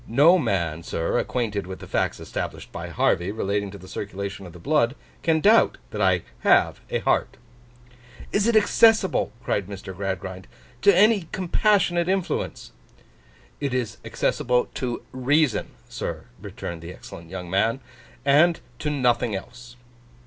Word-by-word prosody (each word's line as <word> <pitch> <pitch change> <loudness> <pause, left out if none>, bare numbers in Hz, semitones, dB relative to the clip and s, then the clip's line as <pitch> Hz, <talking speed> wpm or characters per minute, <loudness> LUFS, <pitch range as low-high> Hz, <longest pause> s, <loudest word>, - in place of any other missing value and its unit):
No 150 +10 +6
man, 85 - -1
sir, 80 0 -1
acquainted 105 -6 -2
with 95 0 -6
the - - -10
facts - - -1
established - - -5
by - - -6
Harvey 90 +3 +1
relating 100 -1 -1
to 100 - -9
the 95 -1 -13
circulation 100 -1 -5
of - - -11
the - - -11
blood, 140 - +1 0.3
can 160 -1 +2
doubt 220 +5 +5
that 105 - -3
I 95 -3 +3 0.2
have - - +3
a - - 0
heart.' - - +1 0.9
'Is 205 +2 +2
it 235 - +3
accessible,' 220 - +4
cried 100 -5 -1
Mr. 100 -2 -8
Gradgrind, 95 0 -4 0.3
'to 200 -3 +6
any 205 -3 +4
compassionate 185 -2 +2
influence?' 185 - -2 0.9
'It 140 -3 -2
is 125 -4 -2
accessible 125 0 0
to 125 -2 -3
Reason, 135 +1 +1 0.2
sir,' - - -5 0.2
returned 85 -1 -7
the 85 +1 -8
excellent 85 -2 -11
young 90 -1 -6
man. 110 +7 +1 0.5
'And 155 +5 +5 0.2
to 150 - -1
nothing 125 -6 +1
else. 120 +4 -9
120 Hz, 145 wpm, -24 LUFS, 95-160 Hz, 0.9 s, No